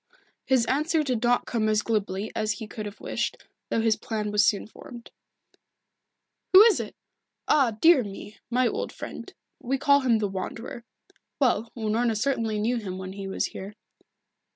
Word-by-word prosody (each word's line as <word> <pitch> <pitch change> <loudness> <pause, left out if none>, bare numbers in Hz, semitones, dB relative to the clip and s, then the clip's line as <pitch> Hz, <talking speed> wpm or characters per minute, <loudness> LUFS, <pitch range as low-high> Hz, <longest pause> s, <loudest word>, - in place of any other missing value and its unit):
His 255 -3 +3
answer 305 +5 +1
did 250 -6 -1
not 245 0 +2
come 220 -2 0
as 215 0 +2
glibly 205 -2 -2
as 215 -1 0
he 210 +3 -7
could 210 0 -6
have 205 - -10
wished, - - -2 0.3
though 230 - +1
his 225 -1 +3
plan 210 -2 -4
was 210 0 +4
soon 205 0 +2
formed. 235 +2 -12 1.4
"Who 380 +3 +11
is 450 -2 +5
it! - - -6 0.5
Ah, 250 -7 +3
dear 325 -3 +6
me! 205 +1 -9
My 250 +1 +2
old - - -3
friend. - - -8 0.3
We 265 +3 -1
call 280 +1 +4
him 250 -4 +3
the 210 -1 0
Wanderer. 225 +5 -6 0.5
Well, 235 -4 +1
Unorna 225 +1 0
certainly 225 -3 0
knew 235 +4 0
him 190 -5 -5
when 190 0 -6
he 195 0 -6
was 190 - -1
here." 200 +2 -8
225 Hz, 170 wpm, -26 LUFS, 210-250 Hz, 1.4 s, Who